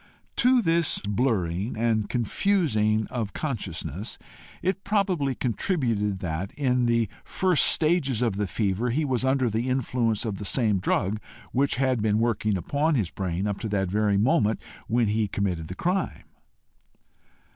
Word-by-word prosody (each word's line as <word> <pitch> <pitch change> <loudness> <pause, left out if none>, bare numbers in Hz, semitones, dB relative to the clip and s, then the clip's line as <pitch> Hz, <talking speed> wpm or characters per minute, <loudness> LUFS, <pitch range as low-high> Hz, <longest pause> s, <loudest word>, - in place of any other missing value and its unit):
To 250 -1 +4
this 165 -2 +3
blurring 105 -3 0
and 110 -2 +1
confusing 115 - +1
of 110 -5 -3
consciousness 105 - -4 0.5
it 190 +1 -1
probably 185 -10 0
contributed, 115 - -1
that, 85 +3 -3
in 125 -3 +1
the 115 -1 +2 0.2
first 185 -4 +2
stages 155 -7 +2
of 110 -5 0
the 105 -1 0
fever, 105 +4 -1
he 150 +6 0
was 130 -3 0
under 130 -1 +2
the 115 +3 -1
influence 120 -3 0
of 105 -4 -3
the - - -5
same 105 -1 +2
drug 100 +3 0 0.3
which 140 +2 +1
had 130 -2 +1
been 105 0 +2
working 110 -3 +1
upon 145 - 0
his 105 -10 0
brain 95 0 -2
up 100 -1 -2
to 110 - -4
the 100 -1 0
very 105 +2 +1
moment 110 -1 +2 0.3
when 115 +1 +2
he 110 0 +1
committed 90 -5 -2
the 90 - -7
crime. 185 - -1
115 Hz, 150 wpm, -26 LUFS, 100-135 Hz, 0.5 s, To